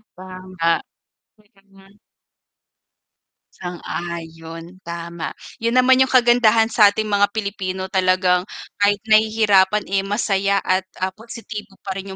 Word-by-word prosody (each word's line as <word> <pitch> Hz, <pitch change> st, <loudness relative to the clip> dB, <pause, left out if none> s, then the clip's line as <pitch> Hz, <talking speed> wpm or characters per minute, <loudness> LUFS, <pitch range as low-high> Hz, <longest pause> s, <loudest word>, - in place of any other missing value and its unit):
Tama. 185 Hz, -2 st, -3 dB, 0.7 s
Wait 210 Hz, -1 st, -29 dB
lang, 195 Hz, +1 st, -27 dB
ha. 195 Hz, +1 st, -20 dB, 1.6 s
Sang-ayon, 170 Hz, -1 st, -7 dB
tama 170 Hz, -3 st, -6 dB, 0.3 s
yun 230 Hz, +2 st, +1 dB
naman 255 Hz, +1 st, +5 dB
yung 265 Hz, -, +3 dB
kagandahan 240 Hz, -3 st, +4 dB
sa 210 Hz, -3 st, +7 dB
ating 215 Hz, +2 st, -3 dB
mga 205 Hz, -1 st, +2 dB
Pilipino 195 Hz, -3 st, -4 dB
talagang 185 Hz, 0 st, +1 dB, 0.3 s
kahit 205 Hz, 0 st, +4 dB
nahihirapan 215 Hz, -2 st, +3 dB
eh, 195 Hz, -, +3 dB
masaya 200 Hz, -1 st, 0 dB
at, 185 Hz, +1 st, +2 dB, 0.2 s
ah, 185 Hz, 0 st, -2 dB
positibo 215 Hz, -2 st, -10 dB
pa 195 Hz, -, -3 dB
rin 195 Hz, +1 st, -7 dB
195 Hz, 120 wpm, -20 LUFS, 185-215 Hz, 1.6 s, sa